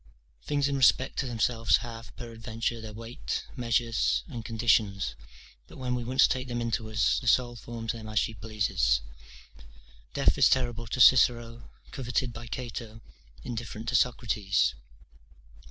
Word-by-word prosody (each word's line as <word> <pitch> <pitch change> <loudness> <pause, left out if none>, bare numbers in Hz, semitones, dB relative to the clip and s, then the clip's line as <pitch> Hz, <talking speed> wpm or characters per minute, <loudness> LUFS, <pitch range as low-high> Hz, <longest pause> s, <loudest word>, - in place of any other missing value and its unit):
Things 145 -1 0
in 140 - -1
respect 130 0 +3
to 135 - -1
themselves 115 -1 +2
have, 115 -4 -9
peradventure, 115 0 -4
their 110 -1 -7
weight, 115 +3 -5
measures, 115 -2 +1
and 120 -7 -7
conditions; 110 - +1 0.5
but - - -14
when 125 -1 -2
we 125 -1 -2
once 130 +3 +4
take 130 0 -1
them 120 -1 -3
into 115 -2 -2
us, 110 0 +2
the 125 - -8
soul 120 0 +3
forms 115 -1 -5
them 110 -2 -8
as 110 - -4
she 115 - +1
pleases. 95 - 0 1.1
Death - - +2
is - - +7
terrible 120 -3 0
to 130 - -4
Cicero, 120 -2 +4 0.2
coveted 125 -2 -2
by 115 +1 -8
Cato, 115 -2 -6 0.4
indifferent 115 -2 -6
to 120 - -1
Socrates. 110 -6 +1
115 Hz, 145 wpm, -28 LUFS, 110-125 Hz, 1.1 s, is